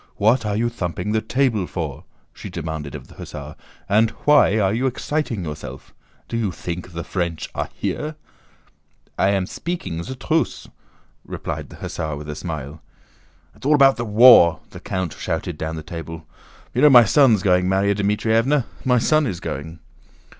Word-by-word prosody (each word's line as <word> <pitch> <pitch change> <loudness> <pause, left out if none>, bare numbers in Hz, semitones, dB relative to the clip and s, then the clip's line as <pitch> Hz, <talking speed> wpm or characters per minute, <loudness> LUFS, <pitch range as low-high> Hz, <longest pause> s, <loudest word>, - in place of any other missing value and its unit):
"What 110 +2 +2
are 105 - -1
you 115 +3 +1
thumping 95 -3 -3
the 110 0 +1
table 115 -4 0
for?" - - -5 0.3
she - - -9
demanded 80 -3 -5
of - - -9
the - - -15
hussar, - - -9 0.3
"and 110 +3 +3 0.2
why 145 -8 +5
are 100 -2 +2
you 125 +4 +1
exciting 130 - -2
yourself? 75 -1 -8 0.3
Do 115 - -3
you 110 -5 -1
think 90 +1 -6
the 85 0 -4
French 85 -3 -3
are - - -3
here?" 155 +1 -3 1.0
"I 95 - +4
am 100 -2 +1
speaking 95 - -4
ze 130 +10 -6
truce," 155 +5 -1 0.6
replied - - -6
the - - -12
hussar 75 -2 -4
with 75 +1 -8
a 75 - -4
smile. 75 -3 -6 0.7
"It's - - -20
all 150 +3 +4
about 135 -2 +5
the 120 - -2
war," 105 -7 +7
the - - -9
count 95 -3 -3
shouted 80 +1 -3
down 80 +1 -4
the 80 - -6
table. 80 0 -8 0.5
"You - - 0
know 150 - +8
my 120 -4 +8
son's 115 -4 +4
going, 90 -1 +3
Márya 95 +2 +2
Dmítrievna? 110 +6 +1 0.2
My 125 -1 +3
son 155 +5 +2
is 90 -5 -4
going." 80 +5 -6
100 Hz, 170 wpm, -21 LUFS, 85-120 Hz, 1.0 s, know